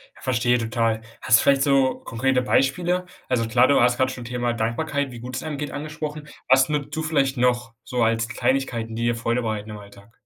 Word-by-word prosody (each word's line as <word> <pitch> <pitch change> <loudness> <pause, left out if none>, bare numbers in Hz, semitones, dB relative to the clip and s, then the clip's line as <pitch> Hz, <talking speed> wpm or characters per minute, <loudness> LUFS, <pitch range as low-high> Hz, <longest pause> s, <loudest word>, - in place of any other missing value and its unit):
Ja, - - -18
verstehe, 125 -1 +1
total. 115 -1 -1 0.2
Hast 115 - +5
du - - 0
vielleicht 140 -1 +4
so 135 -2 +2
konkrete 125 +2 0
Beispiele? 175 +8 +1 0.2
Also 120 -3 +1
klar, 120 +3 +4
du 140 - +4
hast 120 0 +3
grad 130 0 +1
schon 125 -2 -8
Thema 120 0 -2
Dankbarkeit, 135 +5 -2
wie 120 - -9
gut 125 +1 -7
es - - -5
einem 155 -2 -4
geht, 150 +1 -4
angesprochen. 150 0 -6 0.2
Was 135 0 +5
nutzt 145 -1 -2
du 160 - -2
vielleicht 140 -4 +1
noch 120 -1 +1
so 125 -2 -1
als 115 0 +1
Kleinigkeiten, 120 -2 -1
die 115 - -3
dir 120 0 +1
Freude 115 +1 -1
bereiten 110 -2 -4
im 105 - -7
Alltag? 100 +1 -15
125 Hz, 215 wpm, -23 LUFS, 115-140 Hz, 0.2 s, Hast